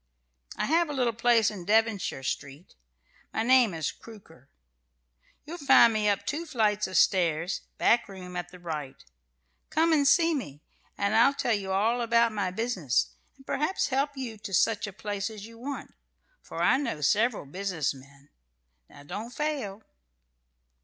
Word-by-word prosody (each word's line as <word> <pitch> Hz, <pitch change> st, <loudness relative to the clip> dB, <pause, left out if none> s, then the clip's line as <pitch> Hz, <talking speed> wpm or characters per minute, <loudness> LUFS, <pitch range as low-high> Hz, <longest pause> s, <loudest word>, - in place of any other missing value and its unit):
"I -, -, 0 dB
have 330 Hz, +1 st, +2 dB
a -, -, -3 dB
little 250 Hz, -4 st, 0 dB
place 230 Hz, -1 st, +3 dB
in 195 Hz, -4 st, -8 dB
Devonshire 215 Hz, -8 st, +1 dB
Street. 140 Hz, +4 st, -5 dB, 0.6 s
My 220 Hz, -, -1 dB
name 250 Hz, -2 st, +5 dB
is 160 Hz, -3 st, -2 dB
Crooker. 160 Hz, -, -16 dB, 1.0 s
You'll 340 Hz, +4 st, -8 dB
find 270 Hz, -4 st, +6 dB
me 210 Hz, -1 st, +1 dB
up 200 Hz, -1 st, -1 dB
two 330 Hz, +3 st, -3 dB
flights 210 Hz, -6 st, +1 dB
of 185 Hz, -, -2 dB
stairs, 170 Hz, -2 st, +2 dB, 0.2 s
back 235 Hz, -3 st, +3 dB
room, 180 Hz, -2 st, -9 dB
at 175 Hz, 0 st, -4 dB
the 180 Hz, -, -13 dB
right. 155 Hz, -6 st, -6 dB, 0.7 s
Come 320 Hz, +1 st, +2 dB
and 285 Hz, -3 st, +3 dB
see 330 Hz, +2 st, +4 dB
me, 150 Hz, -, -5 dB, 0.3 s
and 200 Hz, +2 st, 0 dB
I'll 255 Hz, +5 st, +5 dB
tell 265 Hz, -4 st, 0 dB
you 195 Hz, -2 st, -2 dB
all 225 Hz, +6 st, +1 dB
about 235 Hz, 0 st, +3 dB
my 205 Hz, -3 st, -1 dB
business, 180 Hz, -, -1 dB, 0.3 s
and 270 Hz, -, -19 dB
perhaps 305 Hz, +8 st, -1 dB
help 280 Hz, +1 st, -1 dB
you 235 Hz, -5 st, -6 dB
to 205 Hz, -2 st, -3 dB
such 220 Hz, +2 st, +2 dB
a -, -, -6 dB
place 205 Hz, 0 st, -4 dB
as 210 Hz, -2 st, -9 dB
you 230 Hz, 0 st, -13 dB
want, 275 Hz, +3 st, -6 dB, 0.5 s
for -, -, -5 dB
I -, -, +4 dB
know 235 Hz, -, -3 dB
several 215 Hz, -, +1 dB
business 180 Hz, -1 st, -2 dB
men. 140 Hz, +1 st, -17 dB, 0.6 s
Now 145 Hz, -, -15 dB
don't 210 Hz, +10 st, -6 dB
fail." 255 Hz, -9 st, -3 dB
215 Hz, 165 wpm, -28 LUFS, 180-250 Hz, 1.0 s, find